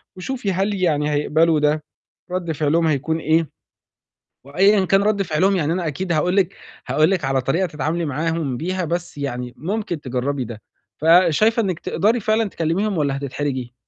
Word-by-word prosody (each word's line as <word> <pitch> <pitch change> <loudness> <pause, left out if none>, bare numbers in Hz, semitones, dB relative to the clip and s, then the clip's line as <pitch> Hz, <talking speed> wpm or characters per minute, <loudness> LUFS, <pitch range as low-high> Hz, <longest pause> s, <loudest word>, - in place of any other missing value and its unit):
وشوفي 205 +2 -3
هل 195 +3 0
يعني 155 -6 +1
هيقبلوا 155 +2 +2
ده، 150 +1 +1 0.5
رَد 180 -2 -2
فعلهم 160 +2 +1
هيكون 155 +2 0
إيه 160 -1 +1 1.0
وأيًا 195 +7 +3
كان 195 +2 +3
رَد 205 -1 +1
فعلهم، 190 +3 +1
يعني 160 -3 0
أنا 175 -1 -2
أكيد 170 +5 -2
هاقول 175 +4 +1
لِك 195 -1 +2 0.3
هاقول 155 +4 +3
لِك 180 -7 0
على 135 0 +1
طريقة 165 +9 0
تتعاملي 155 +2 -2
معاهم 155 -2 -2
بيها، 185 +5 -2
بس 175 -1 -4
يعني 125 -3 -4
ممكن 180 - -3
تجرّبي 130 +1 -2
ده. 110 -2 -9 0.4
فشايفة 180 +8 +4
إنِّك 185 -5 -2
تقدري 225 +4 +1
فعلًا 220 +1 +1
تكلِّميهم 185 +3 -1
والّا 140 -2 0
هتتحرجي؟ 130 -3 -4
165 Hz, 160 wpm, -21 LUFS, 145-190 Hz, 1.0 s, فشايفة